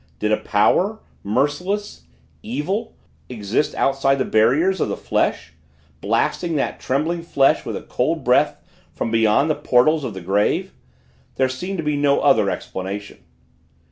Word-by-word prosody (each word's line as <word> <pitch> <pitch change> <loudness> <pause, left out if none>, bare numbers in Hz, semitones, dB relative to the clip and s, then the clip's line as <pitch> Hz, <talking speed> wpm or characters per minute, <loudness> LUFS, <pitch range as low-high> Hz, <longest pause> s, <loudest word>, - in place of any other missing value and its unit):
Did 105 - -1
a 110 - +3
power 180 - +2 0.3
merciless 150 - -2 0.4
evil 220 +1 -3 0.3
exists 110 +3 -1
outside 135 0 +2
the 130 -1 -1
barriers 150 +13 +2
of - - 0
the - - -3
flesh 80 - -1 0.5
blasting 170 -2 0
that 140 - -2
trembling 160 +6 -1
flesh 140 -5 +2
with - - -4
a - - -9
cold - - -1
breath - - +3 0.4
from 115 - -3
beyond 115 +5 +3
the 155 - +2
portals 145 +4 +2
of 115 -6 -5
the 95 - -7
grave? 100 +4 0 0.6
There 130 -1 +1
seemed 180 +10 -5
to 165 - -3
be 150 -1 0
no 145 -1 +3
other - - +3
explanation. 100 +2 -6
135 Hz, 145 wpm, -21 LUFS, 110-165 Hz, 0.6 s, a